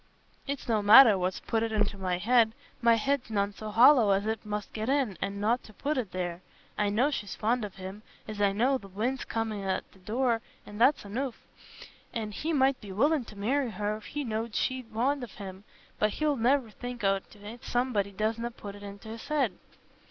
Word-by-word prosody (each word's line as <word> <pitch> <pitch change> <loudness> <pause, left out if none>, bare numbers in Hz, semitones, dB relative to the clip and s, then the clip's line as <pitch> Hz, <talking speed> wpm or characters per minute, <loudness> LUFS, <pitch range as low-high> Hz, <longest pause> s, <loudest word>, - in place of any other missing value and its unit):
"It's 280 -1 -4
no 220 -3 +2
matter 215 +2 +9
what's 185 0 -2
put 225 - -1
it 225 0 -1
into 210 -2 +1
my 185 -2 -1
head. 225 +3 +3 0.3
My 235 -1 +5
head's 265 +2 0
none 200 -1 0
so 215 +2 -7
hollow 235 +1 +6
as 195 +1 0
it 220 0 -2
must 210 -1 -5
get 220 +2 -3
in, 270 -8 +1
an' 200 +1 -3
nought 230 +4 +1
to 215 - -14
put 295 +2 -1
it 235 -9 -2
there. 175 -1 -3 0.3
I 210 -1 +1
know 245 +8 +2
she's 205 -9 -4
fond 230 +2 0
on 205 -2 -5
him, 190 +2 -8 0.3
as 215 -1 -5
I 200 -1 +4
know 255 +6 +2
th' 195 - -13
wind's 235 +7 -2
comin' 225 -2 -2
in 195 - -5
at 190 - -2
the 190 - -20
door, 230 +4 0 0.2
an' 210 +1 -9
that's 265 +5 +4
anoof. 245 +5 -3 0.8
An' 220 -2 -3
he 310 +10 -3
might 270 -3 +2
be 205 -3 -9
willin' 275 +7 +2
to 215 - -12
marry 250 +6 0
her 210 0 -2
if 215 - -11
he 295 0 -4
know'd 225 -2 -3
she's 260 -1 -1
fond 260 +6 0
on 240 - -6
him, 195 -1 -9 0.3
but 210 0 +2
he'll 305 -1 +1
ne'er 245 -1 +2
think 245 0 -7
on't 195 0 0
if 210 +4 -10
somebody 240 -5 0
doesna 220 +4 -1
put 205 -4 -9
it 205 - -12
into's 205 +4 -9
head." 300 -2 +1
220 Hz, 210 wpm, -29 LUFS, 205-250 Hz, 0.8 s, matter